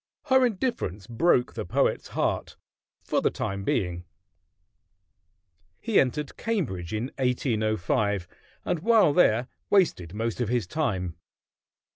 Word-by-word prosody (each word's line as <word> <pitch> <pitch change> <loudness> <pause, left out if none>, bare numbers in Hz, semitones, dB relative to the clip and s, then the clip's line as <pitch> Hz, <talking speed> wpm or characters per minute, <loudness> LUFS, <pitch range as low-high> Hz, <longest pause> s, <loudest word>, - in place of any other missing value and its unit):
Her 260 -1 +6
indifference 185 - -3
broke 125 +3 +2
the 110 - -4
poet's 85 - 0
heart - - -1 0.5
for - - 0
the - - +3
time 100 0 -4
being. 90 -4 -1 1.8
He 225 -2 +2
entered 140 +2 -1
Cambridge 130 - -2
in 110 +5 -3
1805, 110 -6 0 0.4
and 175 - 0
while 215 -4 +4
there 125 -8 +4 0.2
wasted 105 - +2
most 115 +2 -2
of 115 - -1
his 120 -3 +1
time. 90 - -2
115 Hz, 115 wpm, -26 LUFS, 100-160 Hz, 1.8 s, Her